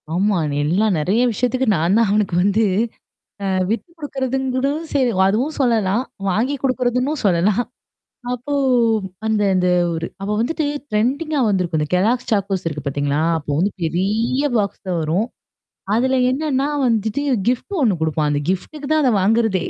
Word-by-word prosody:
ஆமா. 200 +4 +2
அது 145 -1 -2
எல்லாம் 195 +6 +2
நெறைய 195 +10 +1
விஷயத்துக்கு 250 +4 0
நான் 170 +5 +2
தான் 230 -1 +3
அவனுக்கு 205 -3 +1
வந்து, 205 +3 +2 0.8
அ - - -2 0.2
விட்டுக் 335 - -3
குடுக்குறதுன்னு 265 -3 -2
கூட 265 +1 +1 0.3
செய்வேன், 240 -9 +2
அதுவும் 250 +10 0
சொல்லலாம். 225 -3 +2 0.3
வாங்கி 235 +9 0
குடுக்கிறதுன்னும் 255 +2 0
சொல்லலாம். 195 +5 +2 0.7
அப்போ 250 +4 -5 0.7
அந்த 220 -1 +1
அந்த 180 -1 +2 0.3
ஒரு, 165 0 -3 0.2
அவன் 210 +1 -1
வந்துட்டு 310 +7 -1 0.3
ட்ரென்டிங்கா 275 +8 0
வந்திருக்கும். 180 -5 0
இந்த 150 - -2
"கெல்லோக்ஸ் 225 +7 +1
சாகோஸ்" 195 -2 0
இருக்கு 150 -3 -7
பாத்தீங்களா. 145 +1 0 0.2
அப்போ 145 -1 -7
வந்து 190 +4 +1
பெரிய 205 - 0
பாக்ஸ்ல 200 -2 -2
வரும். 165 +8 0 0.7
அதுல 260 +3 +2
என்னன்னா 275 0 0 0.2
வந்துட்டு 225 +2 0 0.3
கிஃப்ட் 255 - -1
ஒண்ணு 220 -7 +3
குடுப்பான். 155 -1 0
அந்த 145 0 0
கிஃப்ட்டுக்கு 280 +10 -4
தான் 310 0 +3
அத 260 - +3
வாங்குறதே. 215 -2 +2
215 Hz, 145 wpm, -20 LUFS, 185-255 Hz, 0.8 s, தான்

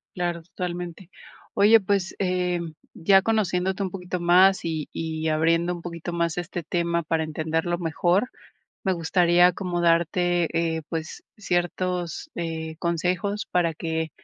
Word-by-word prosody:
Claro, 175 -2 -2
totalmente. 175 +1 -6 0.4
Oye, 215 +3 +6
pues, 195 -1 -1
eh, 180 -2 0 0.3
ya 195 +3 +4
conociéndote 190 -3 0
un 190 - -2
poquito 180 -1 -5
más, 185 +3 +5
y 160 -3 -3
y 160 -1 -3
abriendo 165 +3 +2
un 170 - -9
poquito 170 0 -6
más 170 0 -1
este 175 0 -4
tema 170 +1 -1
para 160 0 0
entenderlo 160 +2 -1
mejor, 175 +6 +1 0.6
me 190 - +2
gustaría 175 +1 +4
acomodarte, 175 -1 +1 0.3
eh, 160 - -4
pues, 165 - -5
ciertos, 175 -3 -2
eh, 160 -1 -4
consejos 180 +5 -1
para 170 -3 +1
que, 160 -1 -3
175 Hz, 130 wpm, -25 LUFS, 165-180 Hz, 0.6 s, Oye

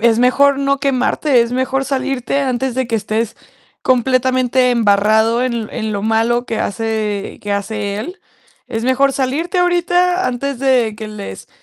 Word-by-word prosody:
es 230 0 +3
mejor 275 +3 +4
no 275 0 0
quemarte, 270 -1 +2
es 235 - -4
mejor 265 +1 0
salirte 270 0 -1
antes 260 -1 -1
de 260 -2 -1
que 230 - -3
estés 215 +1 -2 0.5
completamente 255 0 +2
embarrado 220 +1 +3
en 235 -4 -2
en 220 -3 -3
lo 200 0 -3
malo 225 +2 +1
que 225 - -3
hace 215 -2 -3
que 205 -1 -2
hace 200 0 -3
él. 345 - -6 0.5
Es 225 +1 -3
mejor 275 +2 +2
salirte 295 +8 -1
ahorita 355 +1 +2
antes 255 +1 -3
de 250 -5 +2
que 215 -1 -7
les 200 - -8
250 Hz, 155 wpm, -17 LUFS, 220-270 Hz, 0.5 s, mejor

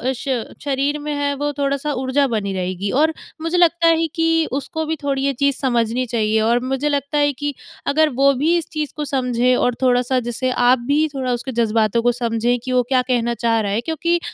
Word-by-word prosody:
श 255 -2 -2 0.2
शरीर 285 +1 0
में 300 0 -4
है 285 0 0
वो 290 +1 -2
थोड़ा-सा 280 +1 -1
ऊर्जा 265 +2 +1
बनी 210 -5 -2
रहेगी 185 +1 -3
और 320 +1 +3 0.3
मुझे 330 +2 -1
लगता 340 -1 +4
है 330 0 +3
कि 325 0 +2
उसको 315 +4 -3
भी 320 - -1
थोड़ी 275 -1 -1
ये 275 - +1
चीज़ 280 -1 +2
समझनी 240 -2 0
चाहिए 220 -2 0
और 235 +2 +2
मुझे 270 +3 -1
लगता 285 +1 -1
है 290 0 +3
कि 290 +2 -3 0.3
अगर 310 +2 +3
वो 275 +2 +4
भी 300 +6 +1
इस 335 - -3
चीज़ 305 -2 -3
को 300 - -3
समझे 250 -2 +1
और 245 -1 +1
थोड़ा-सा 250 0 +2
जैसे 240 +2 -2
आप 250 0 +3
भी 300 +2 +2
थोड़ा 260 -2 -1
उसके 245 +2 -4
जज़्बातों 225 -1 +1
को 245 - +4
समझें 235 0 0
कि 260 - -4
वो 250 -1 +3
क्या 260 -2 +3
कहना 235 -1 +1
चाह 230 -1 +1
रहा 200 - -2
है, 210 +3 0
क्योंकि 335 +4 0
265 Hz, 215 wpm, -20 LUFS, 240-290 Hz, 0.3 s, लगता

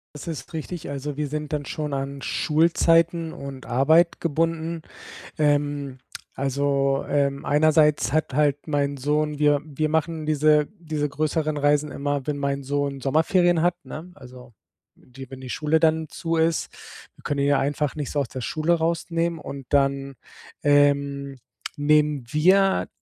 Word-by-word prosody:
Das 150 - -9
ist 155 -5 -6
richtig. 160 -1 -6
Also, 140 +1 -5
wir 150 -1 -2
sind 150 +1 -5
dann 150 -1 -2
schon 150 -2 -4
an 135 0 -4
Schulzeiten 165 +1 +2
und 135 -2 -8
Arbeit 160 +7 +3
gebunden. 165 +1 -1 0.6
Ähm. 145 -2 0 0.4
Also, 140 0 0
ähm, 140 -1 0
einerseits 150 -5 +3
hat 155 -2 0
halt 145 +1 +1
mein 145 -2 0
Sohn 150 +2 0
wir 145 -1 +3
wir 155 0 -2
machen 160 0 -1
diese 150 0 +3
diese 155 -3 -2
größeren 155 +1 -1
Reisen 145 0 +2
immer, 145 -1 -2
wenn 150 -1 -2
mein 140 0 -2
Sohn 140 0 -2
Sommerferien 165 +5 +2
hat, 175 +1 +2
ne? 165 +4 -8
Also 125 -1 -13 0.4
die 130 0 -13
wenn 130 -1 -10
die 130 -1 -7
Schule 155 +1 +1
dann 160 0 +2
zu 165 -1 -2
ist, 160 0 +1 0.4
wir - - -20
können 145 -1 -1
ihn - - +2
ja 145 -1 +3
einfach 145 +1 -1
nicht 145 -3 -4
so 145 - -1
aus 135 -4 -2
der 130 - -6
Schule 155 +7 0
rausnehmen 165 0 -1
und 140 -4 -8
dann, 140 -1 +1 0.5
ähm, 140 -1 +2 0.4
nehmen 150 -1 +2
wir 190 +7 +3
150 Hz, 155 wpm, -24 LUFS, 140-160 Hz, 0.6 s, Arbeit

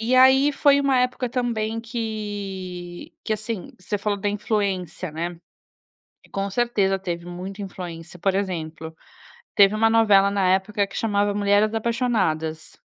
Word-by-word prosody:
E 235 +3 +1
aí 265 +3 +6
foi 280 0 +4
uma 275 -2 +2
época 250 0 0
também 225 -3 -1
que 200 -6 -5
que - - -1
assim, 215 -2 -4
você 205 +3 -3
falou 205 0 -1
da 205 - 0
influência, 200 -4 -2
né, 170 +2 -4 0.9
com 195 0 -2
certeza 200 -4 +1
teve 175 -2 -4
muita 185 +3 -7
influência, 175 -2 -8
por 195 +2 +1
exemplo, 160 -4 -3 0.6
teve 200 +1 +6
uma 225 +1 +3
novela 205 -3 +5
na 195 -2 +1
época 200 +1 0
que 195 - -8
chamava 205 -2 +1
Mulheres 205 +1 +2
Apaixonadas. 215 -10 -1
205 Hz, 140 wpm, -23 LUFS, 185-225 Hz, 0.9 s, aí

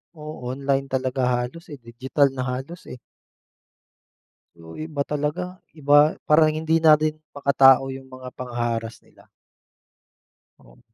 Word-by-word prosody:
o-online 140 -2 -3
talaga 130 0 -2
halos 125 +6 -2
eh, 140 - -10
digital 130 +4 0
na 130 -1 -4
halos 130 +7 -6
eh. 125 - -10 1.6
So 80 0 -13
iba 150 -3 -4
talaga, 165 +5 -4 0.2
iba 145 +1 +4
parang 155 +1 +5
hindi 160 +1 -1
na 155 -1 +7
din 155 0 -1 0.2
makatao 135 -2 +5
'yong 135 0 -11
mga 130 0 -10
pangha-harass 120 -2 -4
nila. - - -23 1.3
Oh. - - -21
135 Hz, 120 wpm, -23 LUFS, 125-150 Hz, 1.6 s, na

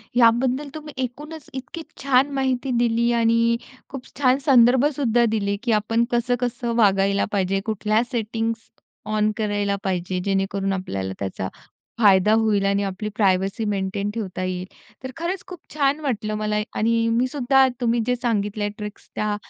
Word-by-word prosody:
याबद्दल 250 +4 +3
तुम्ही 305 -1 -8
एकूणच 295 +5 -7
इतकी 265 +5 -7 0.2
छान 275 0 +3
माहिती 260 -1 0
दिली 235 0 +2
आणि 230 +1 +3
अ, 260 - -18
खूप 270 -2 -8
छान 260 -1 +4
संदर्भसुद्धा 250 -1 +4
दिले 200 -1 0
की 240 - 0
आपण 225 +2 +1
कसं-कसं 240 0 -1
वागायला 200 -2 +3
पाहिजे. 195 0 +1
कुठल्या 215 +1 +1
सेटिंग्स 225 -1 -3 0.5
ऑन 215 0 +2
करायला 205 -2 0
पाहिजे 185 -1 -2
जेणेकरून 195 0 0
आपल्याला 95 - -4
त्याचा 95 -1 -3 0.5
फायदा 205 0 +5
होईल 215 -3 +2
आणि 200 0 +1
आपली 195 +2 -4
प्रायव्हसी 195 +1 +1
मेंटेन 200 0 -2
ठेवता 190 -5 -4
येईल. 185 0 -3 0.4
तर 260 - -5
खरंच 350 +3 -3
खूप 360 -3 -9 0.2
छान 285 0 +2
वाटलं 215 -7 -2
मला 210 0 -1 0.2
आणि 230 +1 +2
मी 245 +2 +2
सुद्धा 265 0 +3
तुम्ही 235 0 +2
जे 250 - +2
सांगितलाय 210 -3 -1
ट्रिक्स 210 -1 -8
त्या 210 -1 -1
225 Hz, 150 wpm, -23 LUFS, 200-250 Hz, 0.5 s, फायदा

